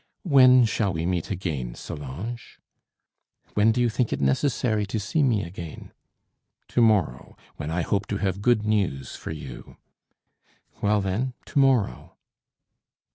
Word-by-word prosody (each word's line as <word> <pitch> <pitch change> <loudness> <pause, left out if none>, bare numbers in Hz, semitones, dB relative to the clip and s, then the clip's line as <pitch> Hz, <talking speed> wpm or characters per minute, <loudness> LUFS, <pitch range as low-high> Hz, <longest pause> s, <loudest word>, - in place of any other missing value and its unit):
"When 130 -6 +6
shall 110 -3 0
we 80 0 -2
meet 90 -2 -1
again, 75 -11 -3
Solange?" 85 - -7 1.0
"When 105 +2 +4
do 120 - -1
you 120 - +3
think 115 +1 -1
it - - -1
necessary 110 - +1
to 110 +2 -2
see 110 +10 -1
me 115 -7 +2
again?" 85 -2 -8 0.8
"To 120 - +1
morrow, 100 - +1 0.2
when 75 - -5
I 85 +2 -1
hope 100 +3 -1
to 100 - -2
have 100 -1 -2
good 115 -1 +2
news 100 - -1
for - - -8
you." 70 -5 -8 1.0
"Well, 105 0 +2
then, 110 +7 -2
to - - -1
morrow." 125 - +1
105 Hz, 140 wpm, -25 LUFS, 85-120 Hz, 1.0 s, When